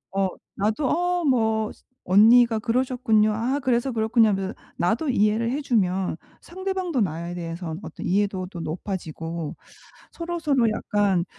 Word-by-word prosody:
어 195 -1 +2 0.3
나도 220 +8 0
'어 355 0 0
뭐 220 -5 +1
스 - - -26 0.2
언니가 225 +5 +6
그러셨군요. 230 -2 +2
아 245 +6 -1
그래서 255 0 +1
그렇군요.' 225 0 +3
하면서 195 0 -1 0.2
나도 225 - 0
이해를 220 0 +2
해 285 +3 -2
주면 190 - 0 0.3
상대방도 375 -5 -2
나에 170 -2 -2
대해서 165 -1 -5
어떤 - - -8
이해도도 190 -2 -1
높아지고 165 -2 -5 0.6
서로서로 325 -8 0
약간 205 -4 +1
220 Hz, 305 characters per minute, -24 LUFS, 190-255 Hz, 0.6 s, 언니가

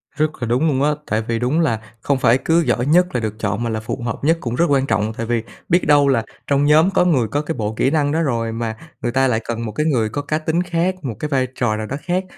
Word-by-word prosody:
Rất 155 0 +1
là 120 - -1
đúng 125 +7 +2
luôn 140 -3 +1
á. 150 - +3 0.2
Tại 110 +1 0
vì 115 -1 -1
đúng 125 +7 +1
là 140 -10 +1 0.2
không 140 +2 +1
phải 125 -1 +4
cứ 165 +4 +2
giỏi 125 -6 0
nhất 175 +5 +4
là - - +2
được 110 0 -4
chọn 105 +1 -1
mà 120 - -1
là 110 -1 -2
phù 110 +3 -5
hợp 115 - -3
nhất 165 +3 +3
cũng 120 -1 -3
rất 170 - +3
quan 135 -1 +3
trọng. 110 -3 0
Tại 115 - -4
vì 115 -1 -1 0.3
biết 175 -1 +2
đâu 145 -1 +5
là 130 -5 +2 0.2
trong 140 0 +2
nhóm 155 +4 +5
có 180 - +3
người 135 -10 +2
có 145 +6 -1
cái 155 +2 -4
bộ 105 -1 -2
kỹ 130 - +2
năng 145 -2 +1
đó 160 +2 +1
rồi 115 -7 -1
mà 115 -1 -3 0.3
người 120 - -1
ta 135 +2 +2
lại 115 -3 +1
cần 115 0 -3
một 110 - -4
cái 150 +7 -1
người 120 -8 +1
có 145 - -3
cá 155 +2 -1
tính 160 +2 0
khác, 175 +1 0
một 120 -6 -4
cái 150 - -3
vai 130 -3 +1
trò 120 -4 0
nào 110 0 -4
đó 135 - -4
khác. 180 +1 -1
135 Hz, 295 wpm, -20 LUFS, 115-155 Hz, 0.3 s, đâu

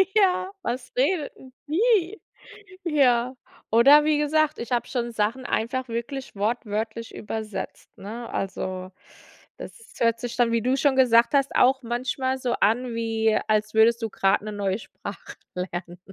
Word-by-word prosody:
Ja. 380 -2 +3
„Was 250 +1 -4
redet 295 +3 +1
denn 260 -1 -15
die?“ 410 +2 +2 0.6
Ja. 255 -6 +2 0.4
Oder 275 +6 +7
wie 305 -1 +3
gesagt, 305 +1 +1
ich 235 +2 -6
habe 240 - 0
schon 240 -2 -2
Sachen 230 +4 -1
einfach 255 +3 -1
wirklich 235 +2 -5
wortwörtlich 220 +1 -3
übersetzt, 215 -1 -6
ne? 230 +4 -7
Also, 185 -1 -4 0.7
das - - -8 0.3
hört 230 0 +2
sich 245 -1 -5
dann, 240 -1 +3
wie 230 - +1
du 255 +4 +1
schon 275 -1 +2
gesagt 235 -1 +5
hast, 275 -1 +2
auch 265 +2 +4
manchmal 255 +2 -2
so 250 -2 -2
an 240 +3 +2
wie, 225 -1 +1
als 215 0 +1
würdest 230 +2 +4
du 225 - -2
grad 195 0 +2
'ne 215 0 -6
neue 200 0 -1
Sprache - - -9 0.2
lernen. 175 -1 -5
235 Hz, 155 wpm, -25 LUFS, 220-265 Hz, 0.7 s, Oder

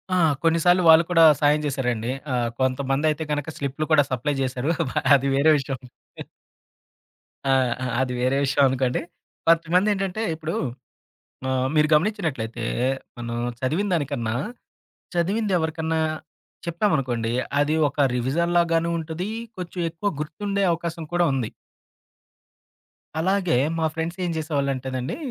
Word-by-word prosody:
ఆ! - - +3 0.3
కొన్నిసార్లు 170 +2 +4
వాళ్ళు 160 +1 +8
కూడా 165 -2 +5 0.2
సాయం 150 +1 +4
జేశారండి. 125 -4 -1 0.2
ఆహ్, 120 -1 +1
కొంతమంది 135 +2 0
అయితే 155 +1 -1
గనక 145 +1 -2
స్లిప్‌లు 140 +2 -2
కూడా 145 -2 +6
సప్లయ్ 135 +3 -1
చేశారు. 130 +2 -2 0.2
బ - - -6 0.2
అది 140 0 +1
వేరే 145 +3 +5
విషయం. 135 -1 -3 1.7
ఆ! - - +3 0.3
ఆ! - - -1 0.2
అది 130 -1 -1
వేరే 130 +2 +2
విషయం 140 +1 +2
అనుకోండి. 130 -1 0 0.5
కొంతమందేంటంటే 185 +5 +2
ఇప్పుడు 160 +1 -4 0.9
ఆహ్, 130 0 +1
మీరు 150 0 +4
గమనించినట్లయితే 150 - 0 0.5
మనం 120 0 -4 0.2
చదివిన 160 +11 0
దానికన్నా, 140 -8 -1 0.8
చదివిందెవరికన్నా 170 -4 0 0.7
చెప్పామనుకోండి 135 - 0 0.3
అది 145 +1 +2
ఒక 140 - -13 0.2
రివిజన్‌లాగాను 165 +6 +1
ఉంటది. 165 +4 -4 0.3
కొంచెం 180 0 -6
ఎక్కువ 170 +5 -2
గుర్తుండే 200 +6 -2
అవకాశం 170 0 -4
కూడా 175 0 +3
ఉంది. 130 -5 -1 1.7
అలాగే 185 -2 +1 0.2
మా 160 - +1
ఫ్రెండ్స్ 165 +2 -3
ఏం 175 - -1
చేసేవాళ్ళంటేనండి 135 -4 -2
155 Hz, 115 wpm, -24 LUFS, 130-170 Hz, 1.7 s, వాళ్ళు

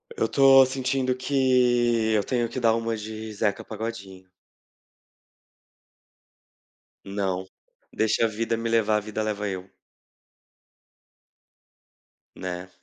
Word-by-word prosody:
Eu - - 0
tô 135 -1 +6
sentindo 130 0 -1
que 125 -4 +2
eu 105 -2 +2
tenho 120 -3 -1
que 130 - -4
dar 115 -1 +4
uma 115 0 -2
de 110 0 -7
Zeca 105 -1 -1
Pagodinho. 95 -5 -7 2.8
Não, 95 -2 -2 0.5
"deixa 110 +1 +1
a - - +3
vida 115 +1 -2
me 115 0 -3
levar, 110 -2 +2
vida 110 +1 -4
leva 105 -1 -2
eu". 95 0 -6 2.7
Né. 90 0 -6
110 Hz, 105 wpm, -25 LUFS, 105-120 Hz, 2.8 s, tô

